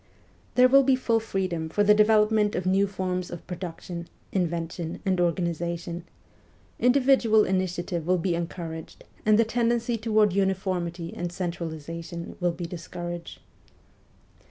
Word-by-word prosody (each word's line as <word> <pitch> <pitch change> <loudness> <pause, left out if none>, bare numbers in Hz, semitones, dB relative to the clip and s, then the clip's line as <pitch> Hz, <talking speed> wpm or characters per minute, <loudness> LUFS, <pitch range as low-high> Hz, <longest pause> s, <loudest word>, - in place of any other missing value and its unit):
There 250 0 +7
will 275 +2 +7
be 270 -1 +4
full 235 -3 +1
freedom 185 -7 -2
for 205 +6 +2
the 210 +1 +6
development 210 0 +4
of 180 - -2
new 195 +2 +3
forms 185 -2 -3
of 175 - -8
production, 175 -1 -6 0.2
invention, 170 -2 -2
and 185 -2 +2
organisation; 170 0 -2 0.7
individual 250 -4 +4
initiative 180 -3 -1
will 185 0 +3
be 175 0 0
en 170 0 -1
couraged, 160 -2 -8 0.2
and 215 -1 +6
the 230 - +4
tendency 235 0 0
toward 215 -3 +3
uniformity 185 -3 -1
and 175 0 -3
centralization 170 -1 -5
will 175 -1 +2
be 170 +1 -6
discouraged. 175 0 -7
180 Hz, 130 wpm, -26 LUFS, 170-210 Hz, 0.7 s, There